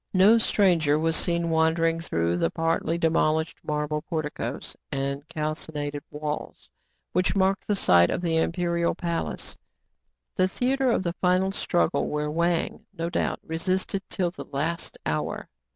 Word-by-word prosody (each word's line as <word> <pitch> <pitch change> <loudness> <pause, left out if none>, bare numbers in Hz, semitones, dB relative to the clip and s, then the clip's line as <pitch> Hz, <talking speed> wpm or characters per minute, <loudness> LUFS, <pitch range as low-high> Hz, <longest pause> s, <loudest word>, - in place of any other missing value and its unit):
No 205 +5 +7
stranger 170 -9 +3
was 160 +1 +1
seen 170 0 +1
wandering 165 +1 +2
through 85 - 0
the 85 -1 +1
part 165 - 0
ly 165 - +1
demolished 160 -1 +1
marble 150 0 -1
porticos 150 -6 -4 0.2
arid 140 +1 -3
calcined 150 -1 -3
walls, 150 0 -5 0.5
which 185 +3 +1
mark 195 +1 +3
the 205 - 0
site 85 - +5
of - - -1
the 165 -2 +1
imperial 170 0 +1
palace, 170 - -3 0.8
the 185 - +3
theatre 260 +6 +1
of 210 - +1
the 170 -2 -1
final 185 +2 +2
struggle, 175 -3 +1
where 150 0 -2
Wang, 170 +1 0
no 165 +1 -2
doubt, - - -1
resisted 185 +4 -1
till 180 -3 -1
the - - -9
last 160 +5 -3
hour. - - -2
165 Hz, 145 wpm, -26 LUFS, 150-180 Hz, 0.8 s, No